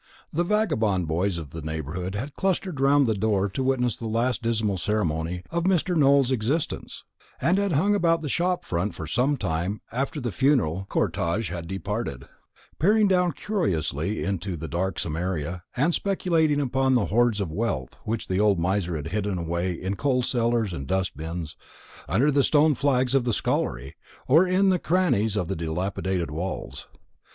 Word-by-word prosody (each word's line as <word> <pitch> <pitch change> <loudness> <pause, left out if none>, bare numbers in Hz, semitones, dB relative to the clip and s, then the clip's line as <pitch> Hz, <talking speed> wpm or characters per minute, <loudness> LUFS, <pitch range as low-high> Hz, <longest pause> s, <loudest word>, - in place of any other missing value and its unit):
The 170 - +1
vagabond 110 - +1
boys 85 +3 0
of 75 -5 -7
the 80 - -6
neighbourhood 80 +5 -4
had 135 +7 -4
clustered 185 -4 -1
round 140 +1 +5
the 110 - +2
door 100 -1 +1
to 100 +8 -3
witness 130 -2 +1
the 115 - -5
last 115 +2 0
dismal 110 -4 0
ceremony 90 -4 -1
of 170 +1 -1
Mr. 185 -1 +2
Nowell's 140 -3 +4
existence, 130 +6 -2 0.4
and 185 +4 +2
had 200 -3 0
hung 195 +9 +3
about 165 -4 +2
the 155 - -4
shop 180 +5 0
front 90 +4 -2
for 80 - -6
some 125 - +1
time 90 +1 -2
after 135 +5 -2
the 120 -4 -3
funeral 95 - +1
cortège 85 +5 0
had 85 -1 -5
departed, 95 - -4 0.5
peering 205 +4 +4 0.2
curiously 95 - -1
down - - -3
into 95 -2 -3
the 80 +1 -6
darksome 85 -3 -2
area, 85 0 -3 0.2
and 155 +7 +2
speculating 165 -7 +1
upon 130 -1 +1
the 115 -5 +2
hoards 115 0 +2
of 95 -6 -2
wealth 90 - -3
which 110 +1 -3
the 95 +1 0
old 105 -2 +4
miser 90 0 0
had 80 +1 -4
hidden 100 0 -1
away 85 +2 -1
in 95 +3 -3
coal 125 +1 +1
cellars 115 -5 0
and 70 -4 -5
dust 95 -1 -1
bins, 80 +1 -5 0.5
under 125 - +3
the 140 -1 +3
stone 150 +2 +4
flags 130 -2 +1
of 135 -2 +3
the 120 -1 0
scullery, - - -1 0.3
or 160 +8 +5
in 190 +2 +3
the 185 -1 +2
crannies 160 - +1
of 90 - -1
the - - -2
dilapidated 90 +1 -2
walls. 90 +5 -5
110 Hz, 175 wpm, -25 LUFS, 90-140 Hz, 0.5 s, round